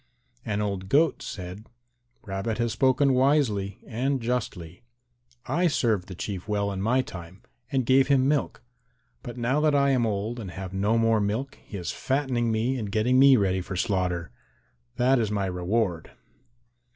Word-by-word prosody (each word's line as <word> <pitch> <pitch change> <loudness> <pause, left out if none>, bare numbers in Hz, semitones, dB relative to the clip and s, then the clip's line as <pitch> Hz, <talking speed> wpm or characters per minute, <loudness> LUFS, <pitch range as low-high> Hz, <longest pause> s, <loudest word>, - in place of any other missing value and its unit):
And 105 0 -2
old 95 -2 -4
Goat 150 +4 +3
said, 95 +3 -7 0.6
"Rabbit 100 +3 -3
has 120 -1 0
spoken 135 +1 +3
wisely 125 -7 +1
and 130 +4 -1
justly. 110 -7 -4 0.6
I 170 +8 +1
served 115 - 0
the 95 - -8
Chief 95 +1 -5
well 100 -1 0
in 95 -1 -4
my 125 +5 +2
time 90 -1 -10 0.3
and 130 -3 +1
gave 130 +2 +4
him 135 -2 +3
milk, 145 -1 -1 0.6
but 120 -2 -8
now 125 +4 +1
that 150 -1 +2
I 140 0 +3
am 125 -3 +2
old 110 +3 -3
and 100 -5 -6
have 95 +1 -7
no 105 +4 +1
more 115 -1 +3
milk 110 +7 -3
he 100 - -8
is 90 - -4
fattening 130 -4 -1
me 120 +4 0
and 105 -3 -4
getting 120 +5 +2
me 135 -1 +7
ready 95 -3 +1
for 95 - -6
slaughter. 90 -3 -1 0.6
That 130 +1 +3
is 110 -3 0
my 100 -2 -1
reward." 90 -1 -1
110 Hz, 165 wpm, -26 LUFS, 95-130 Hz, 0.6 s, me